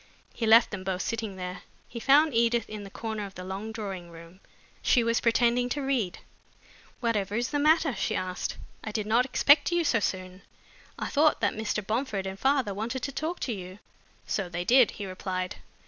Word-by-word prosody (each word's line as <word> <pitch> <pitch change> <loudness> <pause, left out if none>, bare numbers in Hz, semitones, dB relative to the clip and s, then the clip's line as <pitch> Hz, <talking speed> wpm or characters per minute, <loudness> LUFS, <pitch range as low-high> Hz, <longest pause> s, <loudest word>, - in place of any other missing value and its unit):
He 225 - -2
left 225 +2 +7
them 200 -3 -5
both 185 -1 -2
sitting 225 -4 -3
there. 180 -1 -6 0.3
He 235 - -7
found 290 +4 +5
Edith 230 -1 +2
in 215 -1 -7
a 200 - -9
corner 220 +1 -4
of 195 -1 -8
the 185 - -7
long 195 +4 -5
drawing 195 -6 -6
room. 170 +2 -13 0.4
She 245 - +3
was 230 0 +1
pretending 240 +1 +2
to 285 +3 -2
read. 250 -9 0 0.8
"Whatever 210 -4 0
is 240 +2 -1
the 290 - 0
matter?" 310 -1 +4
she 195 - -1
asked. 185 -1 -3 0.3
"I 215 - -4
did 210 -1 -2
not 230 +4 +3
expect 285 +4 +4
you 345 0 +2
so 245 -7 +2
soon. 185 -1 -3 0.6
I - - -3
thought 305 +1 +3
that - - +2
Mr. 215 -1 -2
Bomford 215 -3 -2
and 190 0 -5
father 265 -5 +2
wanted 230 +6 -4
to 275 - -2
talk 315 +5 -3
to 245 - -1
you." 185 -1 -8 0.5
"So 195 -4 -2
they 175 0 -4
did," 250 +1 +6
he 205 - -4
replied. 185 -1 -4
220 Hz, 195 wpm, -28 LUFS, 190-250 Hz, 0.8 s, left